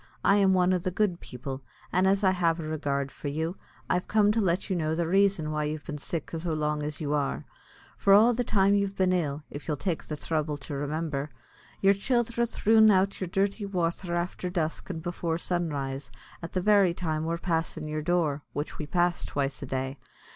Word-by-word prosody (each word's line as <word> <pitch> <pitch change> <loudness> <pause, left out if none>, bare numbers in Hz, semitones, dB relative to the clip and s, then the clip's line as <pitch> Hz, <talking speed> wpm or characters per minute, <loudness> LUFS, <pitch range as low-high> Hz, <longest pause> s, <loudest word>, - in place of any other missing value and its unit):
I 200 - +6
am 190 -2 +4
one 180 0 +3
o' 180 - +2
the 185 +2 -2
good 185 -1 0
people; 130 +2 -7 0.3
an' 185 +1 +3
as 195 +2 +2
I 190 - +5
have 170 -3 +1
a - - -4
regard 140 -3 -2
for - - -7
you, 160 +5 -2 0.3
I'm 180 - +2
come 210 +1 +3
to 225 +1 +1
let 185 -1 +1
you 190 - -1
know 160 -2 0
the 170 +1 0
raison 190 -3 +2
why 150 0 -1
you've 150 0 -4
been 150 -3 -5
sick 160 +2 -4
so 165 0 -2
long 150 -1 -1
as 150 0 -4
you 150 -1 -1
are. 145 0 -1 0.5
For 200 - +2
all 220 +5 +7
the 245 +2 0
time 200 -3 +3
you've 200 -1 +1
been 185 -1 +2
ill, 150 -4 -1
if 145 - -8
you'll 150 - -1
take 175 +1 -2
the 155 - -4
thrubble 150 -1 -2
to 145 - -6
remimber, 145 0 -2 0.5
your 195 0 +6
childhre 235 +2 0
threwn 220 -1 +5
out 195 +1 +2
yer 185 - -1
dirty 200 +4 0
wather 175 -1 -1
afther 175 +1 -2
dusk 165 -2 -2
an' 165 -3 -4
before 170 -1 -2
sunrise, 145 -6 -2 0.3
at 170 - -7
the 185 - 0
very 200 -3 +4
time 160 -3 -2
we're 165 +1 -1
passin' 165 -3 -2
yer 155 0 -2
door, 155 -3 +1
which 145 +1 -4
we 155 - -4
pass 175 +1 +1
twice 140 -1 -2
a 140 - -5
day. 130 +1 -3
170 Hz, 210 wpm, -28 LUFS, 150-190 Hz, 0.5 s, all